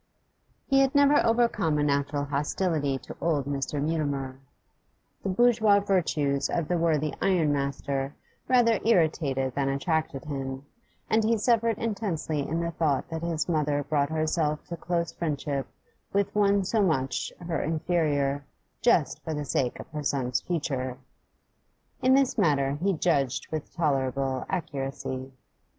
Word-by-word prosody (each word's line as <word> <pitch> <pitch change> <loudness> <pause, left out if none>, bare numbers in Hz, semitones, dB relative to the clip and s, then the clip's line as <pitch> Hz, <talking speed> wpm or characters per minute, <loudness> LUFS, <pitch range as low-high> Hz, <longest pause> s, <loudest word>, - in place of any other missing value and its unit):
He 270 -1 +3
had 270 +1 +3
never 285 +1 +5
overcome 230 -9 +2
a 145 - +1
natural 145 0 0
hostility 145 0 0
to - - -10
old 150 -5 +1
Mr. 140 0 -2
Mutimer: 140 -4 -2 0.8
the 195 - -3
bourgeois 220 0 +4
virtues 155 -8 +1
of 170 -3 -1
the 175 - +1
worthy 155 -3 +1
ironmaster 140 -5 0 0.3
rather 240 -3 +4
irritated 155 - +2
than 135 0 0
attracted 140 0 -1
him, 135 -2 -5 0.4
and 220 0 +2
he 225 +1 +2
suffered 230 0 +2
intensely 195 -9 -2
in 155 +4 -1
the 170 0 -2
thought 150 -5 0
that 160 0 -3
his 170 -2 -1
mother 150 -3 +1
brought 145 -1 0
herself 155 -1 0
to 170 - -3
close 170 0 -2
friendship 145 -4 -2 0.4
with 200 0 0
one 200 -1 +3
so 220 +3 +1
much 135 -9 0
her 170 -3 -2
inferior 150 -3 0 0.4
just 170 - +2
for 160 - -3
the 150 0 -3
sake 130 -2 -1
of - - -8
her 150 -1 -5
son's 130 -4 0
future. 135 -7 -2 1.0
In 260 +1 +5
this 270 -3 +2
matter 140 -7 +3
he 195 +2 +2
judged 140 -6 0
with 155 -2 -4
tolerable 135 -4 -1
accuracy. 135 -5 -4
155 Hz, 140 wpm, -27 LUFS, 140-185 Hz, 1.0 s, never